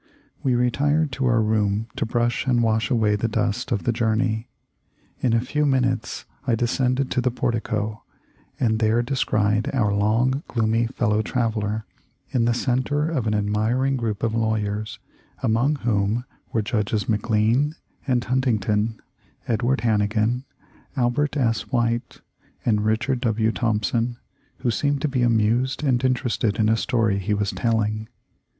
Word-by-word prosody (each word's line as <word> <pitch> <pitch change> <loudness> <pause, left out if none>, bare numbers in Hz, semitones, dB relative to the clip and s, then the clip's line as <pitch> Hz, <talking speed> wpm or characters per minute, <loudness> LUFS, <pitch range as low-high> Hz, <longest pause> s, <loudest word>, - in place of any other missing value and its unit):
We 130 -4 +1
retired 145 +5 +1
to 130 0 -1
our 115 -2 +3
room 105 0 +1
to - - -1
brush 120 +2 0
and 120 -2 +3
wash 110 -1 +1
away 110 -5 +2
the 105 +3 0
dust 110 +2 -1
of 100 - 0
the 120 - +1
journey. 110 0 0 0.7
In 125 -3 +1
a 115 - +4
few 150 +5 -1
minutes 130 -3 0 0.2
I 120 - +3
descended 125 +3 0
to 125 - +1
the 125 - +1
portico, 110 -2 -2 0.6
and 110 -4 +1
there 115 +2 +2
descried 105 -5 +1
our 105 -5 +2
long, 115 +7 +2
gloomy 115 0 +1
fellow 110 -4 0
traveller 110 -2 -1 0.5
in 125 -4 +2
the 120 - +3
center 140 +5 0
of 130 -8 -1
an 105 - +1
admiring 110 +6 +1
group 115 -4 -3
of 115 -1 +1
lawyers, 110 -2 -1 0.5
among 120 +7 +2
whom 115 -2 0 0.3
were 110 - 0
Judges 105 -2 -1
McLean 115 +7 +1 0.3
and 125 -2 +2
Huntington, 115 -4 0 0.5
Edward 120 +3 +1
Hannigan, 110 +3 +1 0.5
Albert 130 +4 +1
S. 115 -4 0
White, 120 -2 -1 0.4
and 105 -3 +2
Richard 120 +4 0
W. 110 -2 +1
Thompson, 115 +1 0 0.4
who 120 - +1
seemed 140 +3 0
to - - +3
be 135 -3 -1
amused 120 +4 +2
and 130 -3 +2
interested 120 -4 +1
in 110 -2 +2
a 110 - +4
story 110 -4 +1
he 105 +2 0
was 100 -1 -1
telling. 110 -2 0
115 Hz, 145 wpm, -23 LUFS, 110-125 Hz, 0.7 s, a